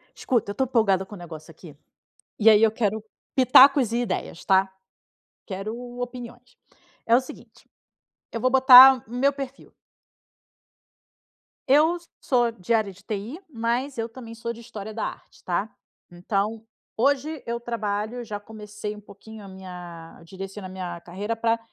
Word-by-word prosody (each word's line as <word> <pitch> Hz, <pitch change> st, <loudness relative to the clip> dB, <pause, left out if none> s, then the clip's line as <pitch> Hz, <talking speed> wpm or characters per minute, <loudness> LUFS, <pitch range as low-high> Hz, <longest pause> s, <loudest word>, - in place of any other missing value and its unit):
Escuta, 230 Hz, -5 st, -1 dB
eu -, -, -5 dB
estou 265 Hz, +5 st, 0 dB
empolgada 210 Hz, -6 st, +2 dB
com 205 Hz, -, -11 dB
o -, -, -10 dB
negócio 165 Hz, -2 st, -10 dB
aqui, 160 Hz, -2 st, -14 dB, 0.6 s
e 220 Hz, +1 st, +5 dB
aí 215 Hz, 0 st, +5 dB
eu 225 Hz, -, +5 dB
quero 220 Hz, -1 st, -1 dB, 0.3 s
pitacos 260 Hz, -1 st, +6 dB
e 235 Hz, -, +1 dB
ideias, 190 Hz, -6 st, -4 dB
tá? 190 Hz, 0 st, +3 dB, 0.7 s
Quero 200 Hz, +3 st, -5 dB, 0.2 s
opiniões. 245 Hz, 0 st, -8 dB, 0.5 s
É 230 Hz, -, +4 dB
o -, -, +3 dB
seguinte: 255 Hz, -, -14 dB, 0.6 s
eu 230 Hz, -, -4 dB
vou 255 Hz, -, +2 dB
botar 260 Hz, -1 st, +9 dB
o -, -, -13 dB
meu 270 Hz, +3 st, +2 dB
perfil 275 Hz, -1 st, -8 dB, 2.0 s
Eu 305 Hz, +6 st, +4 dB, 0.2 s
sou 240 Hz, -3 st, +1 dB
de 230 Hz, +1 st, -3 dB
área 215 Hz, -3 st, +1 dB
de 195 Hz, +2 st, -19 dB
TI, 215 Hz, -, -5 dB
mas 245 Hz, +2 st, -2 dB
eu 225 Hz, 0 st, -3 dB
também 230 Hz, -1 st, -10 dB
sou 230 Hz, +1 st, -5 dB
de 235 Hz, -, -12 dB
história 220 Hz, -2 st, -8 dB
da 220 Hz, -, -3 dB
arte, -, -, -10 dB
tá. 185 Hz, +4 st, -2 dB, 0.4 s
Então, 200 Hz, +5 st, -2 dB, 0.3 s
hoje 280 Hz, +4 st, 0 dB
eu 235 Hz, 0 st, -3 dB
trabalho 225 Hz, 0 st, -3 dB
já 210 Hz, -3 st, -6 dB
comecei 210 Hz, 0 st, -8 dB
um 210 Hz, -, -12 dB
pouquinho 210 Hz, +1 st, -13 dB
a 195 Hz, -, -11 dB
minha 180 Hz, -4 st, -11 dB
direcionar 190 Hz, +2 st, -8 dB
a -, -, -11 dB
minha 180 Hz, -2 st, -6 dB
carreira 200 Hz, +7 st, -4 dB
pra 230 Hz, 0 st, 0 dB
220 Hz, 155 wpm, -24 LUFS, 195-245 Hz, 2.0 s, botar